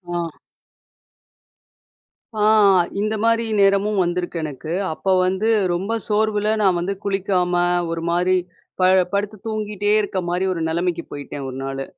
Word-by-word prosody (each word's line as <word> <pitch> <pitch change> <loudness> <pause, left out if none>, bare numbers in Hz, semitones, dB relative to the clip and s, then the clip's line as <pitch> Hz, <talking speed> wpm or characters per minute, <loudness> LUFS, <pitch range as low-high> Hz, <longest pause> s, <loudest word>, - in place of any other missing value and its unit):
ஆ. - - 0 2.1
ஆ! 215 - -3 0.6
இந்தமாரி 225 +2 +1
நேரமும் 200 +1 +3
வந்திருக்கு 175 0 -2
எனக்கு. 155 +1 -6 0.2
அப்ப 175 - -11 0.2
வந்து 190 +4 0 0.2
ரொம்ப 190 +5 -3 0.2
சோர்வுல 210 0 +1
நான் 190 -3 +3
வந்து 185 +3 -2
குளிக்காம 190 -2 0 0.4
ஒருமாரி 170 +2 +1 0.4
ப - - -1 0.3
படுத்து 205 +1 -2
தூங்கிட்டே 210 -2 -1
இருக்கமாரி 185 -3 -1
ஒரு 170 - -4
நிலைமைக்கு 170 +1 -1
போயிட்டேன் 145 -1 -6
ஒரு 130 - -7
நாளு. 135 0 -4
190 Hz, 115 wpm, -21 LUFS, 175-210 Hz, 2.1 s, நேரமும்